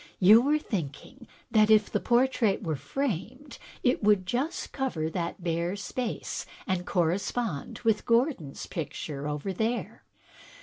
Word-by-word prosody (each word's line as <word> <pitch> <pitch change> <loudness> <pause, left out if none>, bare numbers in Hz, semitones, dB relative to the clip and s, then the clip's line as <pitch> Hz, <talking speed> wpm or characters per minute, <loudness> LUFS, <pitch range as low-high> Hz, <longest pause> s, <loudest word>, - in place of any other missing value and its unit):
You 210 +5 +8
were 290 +4 +3
thinking 215 - -5 0.2
that 215 -1 +5
if 215 -1 +5
the - - +1
portrait 240 -4 +2
were 160 -4 -1
framed 255 - -4 0.2
it 250 -3 +2
would 205 -3 +4
just 270 - -2
cover 170 - -2
that 170 +1 -4
bare 170 +2 -1
space 225 +4 -4 0.2
and 185 -2 -2
correspond 185 0 -1
with 225 -2 +1
Gordon's 230 - +1
picture 150 -3 -5
over 150 +6 -3
there." 225 +5 -2
205 Hz, 130 wpm, -28 LUFS, 170-245 Hz, 0.2 s, You